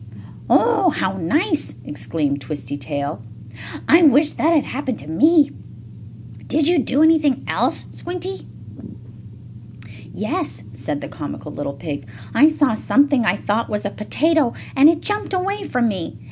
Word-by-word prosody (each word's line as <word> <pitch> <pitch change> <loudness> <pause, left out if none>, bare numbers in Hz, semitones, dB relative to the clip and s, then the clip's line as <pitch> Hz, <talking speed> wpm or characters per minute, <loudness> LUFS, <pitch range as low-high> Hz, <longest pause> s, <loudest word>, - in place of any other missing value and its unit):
"Oh, 425 -6 +4
how 190 - -2
nice!" 305 - 0
exclaimed 145 -1 -2
Twisty 145 -2 -5
Tail. 140 -4 -4 0.7
"I 330 +3 +6
wish 295 -1 +5
that 320 - +1
had 310 -4 +3
happened 265 -3 -4
to 140 - -10
me. 300 - +4 1.0
Did 305 -1 +1
you 345 -2 +4
do 280 +2 +2
anything 310 -5 +3
else, - - 0
Squinty?" 365 +2 -4 1.6
"Yes," 290 - -4
said 125 +6 -4
the - - -6
comical 150 0 -7
little 145 -1 -5
pig. 140 -3 -6 0.3
"I 300 - +6
saw 295 -6 +2
something 275 +2 +2
I - - +3
thought 215 +3 -2
was 210 0 -3
a 200 - -2
potato, 300 +5 +1 0.2
and 280 +3 +7
it 325 -1 +1
jumped 415 -1 -2
away 395 +3 -1
from 245 -2 +1
me. 190 -6 -4
270 Hz, 145 wpm, -20 LUFS, -, 1.6 s, and